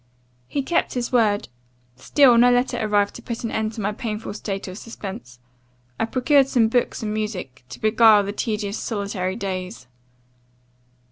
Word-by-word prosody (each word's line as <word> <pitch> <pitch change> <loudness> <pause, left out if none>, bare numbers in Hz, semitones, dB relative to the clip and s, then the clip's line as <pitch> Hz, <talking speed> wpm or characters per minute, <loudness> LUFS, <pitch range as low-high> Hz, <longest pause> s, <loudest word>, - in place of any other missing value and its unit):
"He 280 - -2
kept 335 0 0
his 245 -1 -2
word; 215 -5 +2 0.5
still 250 - +4
no 240 +1 +6
letter 245 +1 +1
arrived 205 -2 +1
to - - -10
put 235 -1 -6
an 230 - -3
end 220 0 -2
to 215 - -6
my 205 +1 0
painful 210 0 -5
state 195 -2 -5
of 185 +3 -7
suspense. 190 - -8 0.6
I - - +2
procured 270 +3 +3
some 235 -5 +2
books 240 -1 0
and 210 -1 -2
music, 185 - -5
to - - -9
beguile 215 -1 +5
the 200 +1 -4
tedious 210 -2 -3
solitary 200 -4 -3
days. 185 - -5
215 Hz, 160 wpm, -22 LUFS, 200-235 Hz, 0.6 s, no